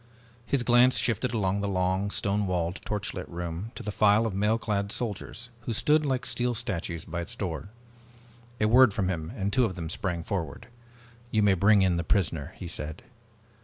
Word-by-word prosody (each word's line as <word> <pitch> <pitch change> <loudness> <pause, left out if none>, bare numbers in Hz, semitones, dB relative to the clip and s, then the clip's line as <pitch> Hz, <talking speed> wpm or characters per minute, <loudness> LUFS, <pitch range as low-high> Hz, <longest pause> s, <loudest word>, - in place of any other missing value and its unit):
His 140 -3 +1
glance 120 +1 +5
shifted 120 +2 0
along 100 -3 0
the 100 - -1
long 95 +1 0
stone 100 0 0
walled, 90 0 -1
torchlit 100 -3 -3
room 85 +4 -5
to - - -7
the 105 - -3
file 105 +2 +4
of 110 - -2
mail 105 +3 +2
clad 100 -3 -2
soldiers 115 +2 -4 0.2
who 115 - 0
stood 150 +7 +3
like 130 -2 -1
steel 120 0 0
statues 90 -8 -3
by 85 +1 -4
its 105 +8 -6
door. 95 -3 -4 0.9
A 105 - +3
word 120 -2 +6
from 95 -4 0
him 80 -3 -3
and 100 +1 -2
two 130 - +4
of 95 - -3
them 80 -3 -4
sprang 85 -4 -2
forward. 85 +1 -4 0.6
"You 110 -2 +2
may 100 -1 +5
bring 100 +2 +5
in 90 -2 +2
the 85 - -1
prisoner," 80 -5 0
he 90 - -6
said. 80 -1 -6
100 Hz, 190 wpm, -28 LUFS, 90-115 Hz, 0.9 s, word